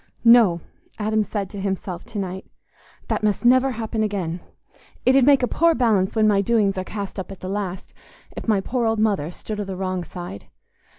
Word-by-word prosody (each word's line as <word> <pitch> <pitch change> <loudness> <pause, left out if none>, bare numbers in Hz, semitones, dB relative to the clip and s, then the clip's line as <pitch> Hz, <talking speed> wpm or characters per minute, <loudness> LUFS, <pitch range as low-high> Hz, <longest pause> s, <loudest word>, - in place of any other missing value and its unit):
"No!" 225 -8 +6 0.4
Adam 215 0 +1
said 205 -1 -3
to 200 - -6
himself 190 -2 -3
to 220 - -8
night, 190 -1 -4 0.6
"that - - -1
must 210 +2 0
never 255 +2 +5
happen 220 -1 -3
again. 190 -5 -2 0.7
It 255 - +5
'ud 270 - +6
make 275 -3 +5
a - - +3
poor 335 +4 +3
balance 215 -7 +2
when 215 -1 +4
my 200 -2 +3
doings 205 -2 +2
are - - -2
cast 200 0 -6
up 190 - -6
at 195 - -10
the 185 - -5
last, 190 -2 -4 0.4
if - - -7
my 210 -3 +3
poor 240 +3 -1
old 225 0 +1
mother 205 -8 +1
stood 210 +4 -6
o' - - -1
the 195 -1 -6
wrong 185 -1 -2
side. 175 - -8
205 Hz, 200 wpm, -22 LUFS, 190-225 Hz, 0.7 s, No